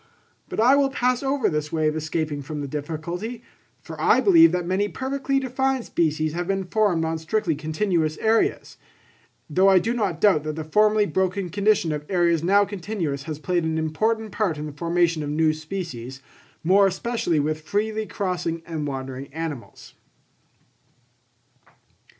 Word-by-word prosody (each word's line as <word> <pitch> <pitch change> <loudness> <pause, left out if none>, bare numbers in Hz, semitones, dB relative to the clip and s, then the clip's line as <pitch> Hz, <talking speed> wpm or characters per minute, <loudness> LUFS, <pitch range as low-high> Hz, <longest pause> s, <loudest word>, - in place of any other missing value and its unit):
But - - -5
I 250 +5 +6
will 280 -1 +3
pass 250 -2 0
over 275 0 +1
this 150 -1 -2
way 155 -1 +1
of 155 - 0
escaping 155 -2 -2
from 150 +2 -6
the 140 - -4
difficulty; 170 - -5 0.4
for - - -8
I - - +5
believe 335 -4 +6
that 180 -1 -1
many 190 +3 0
perfectly 275 +3 -1
defined 265 -1 -1
species 155 -2 0
have 175 +1 -3
been 195 0 0
formed 185 -4 +1
on 160 0 -2
strictly 170 +1 0
continuous 155 +1 -1
areas; 220 0 0 0.7
though 185 +6 +4
I 190 - +6
do 225 +6 +1
not 200 -9 -1
doubt 190 -7 +4
that 155 -1 -3
the 160 - -4
formerly 210 +5 +3
broken 185 +1 -1
condition 200 -3 +2
of 150 -1 -3
areas 170 -3 +2
now 200 +3 +4
continuous, 180 -8 -4
has 155 - -3
played 175 +2 -1
an 160 0 -1
important 215 +8 -1
part 185 -6 -1
in 150 - -5
the 150 - -6
formation 170 +2 0
of 145 - -4
new 155 +1 +2
species, 155 -6 -6 0.4
more 195 +4 +5
especially 190 -4 -1
with 155 +2 -1
freely 215 +5 -2
crossing 175 -4 -3
and 160 -3 -4
wandering 135 0 -6
animals. 155 -5 -7
175 Hz, 160 wpm, -24 LUFS, 155-210 Hz, 0.7 s, I